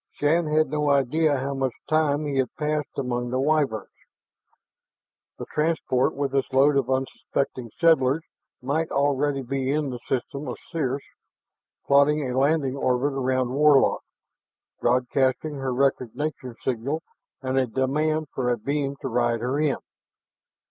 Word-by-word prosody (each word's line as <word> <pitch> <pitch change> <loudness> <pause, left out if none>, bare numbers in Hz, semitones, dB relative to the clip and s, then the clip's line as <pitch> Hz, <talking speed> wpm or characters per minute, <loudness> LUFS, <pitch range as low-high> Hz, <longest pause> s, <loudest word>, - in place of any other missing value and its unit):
Shann 160 +3 +1
had 155 0 +2
no 150 -1 0
idea 140 +2 +2
how 135 +2 -2
much 135 -3 -1
time 155 -1 +2
he 140 -2 -2
had 130 -3 +1
passed 150 -1 -2
among 120 -2 -2
the 130 +1 -1
Wyverns; 140 -6 0 1.5
the - - -6
transport 150 -5 0
with 140 -1 -2
its 135 -1 0
load 140 +2 +4
of 140 - +1
unsuspecting 130 -1 -2
settlers 160 -3 +4 0.4
might 155 +5 0
already 140 0 +1
be 130 +1 -2
in 145 -2 0
the 125 - -6
system 135 +2 -2
of 125 - -4
Circe, 140 -5 -1 0.8
plotting 140 +1 +4
a 125 - -3
landing 140 0 +2
orbit 135 +1 +1
around 130 -2 0
Warlock, 145 -1 +4 0.8
broadcasting 130 +4 +1
her 135 -1 -2
recognition 130 0 -1
signal 135 +6 -2 0.4
and 130 0 +1
a 130 - +1
demand 150 +5 0
for 125 -2 -1
a 120 - +1
beam 140 +3 -2
to - - -3
ride 120 -1 +1
her 130 +4 -1
in. 150 -3 +1
135 Hz, 140 wpm, -25 LUFS, 130-150 Hz, 1.5 s, load